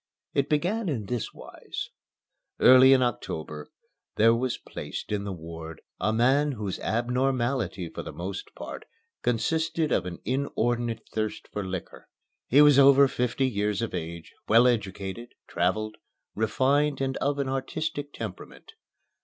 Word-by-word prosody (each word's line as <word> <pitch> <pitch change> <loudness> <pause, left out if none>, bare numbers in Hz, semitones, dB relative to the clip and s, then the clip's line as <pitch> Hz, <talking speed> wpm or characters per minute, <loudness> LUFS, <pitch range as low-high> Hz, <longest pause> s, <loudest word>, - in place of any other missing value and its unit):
It 140 -1 +1
began 180 +7 0
in 115 -9 -2
this 120 +2 -3
wise: - - -8 0.7
Early 130 +1 +8
in 130 -1 +6
October 80 -10 -4 0.5
there 115 +2 +5
was 125 +1 -1
placed - - -7
in 100 -1 -1
the 100 - -3
ward 80 -2 -8 0.2
a 110 - +1
man 135 +6 +3
whose 105 -5 -4
abnormality 120 -4 0
for - - -7
the - - -7
most 95 +3 -6
part - - -8 0.4
consisted 160 +7 0
of 90 - +1
an 85 - -6
inordinate 120 -3 -1
thirst 110 -1 -3
for 105 - -2
liquor. 95 -1 -6 0.4
He 145 +4 +6
was 145 -2 +7
over 140 0 +7
fifty 125 +1 0
years 105 -2 -1
of 115 - -3
age, 85 -1 -6
well 115 +3 +6
educated, 105 -1 -2
traveled, 110 +5 -1 0.4
refined 135 +7 +1
and 135 -1 -1
of 145 0 0
an 140 -1 -1
artistic 145 +2 -3
temperament. 110 -8 -8
120 Hz, 140 wpm, -27 LUFS, 100-135 Hz, 0.7 s, Early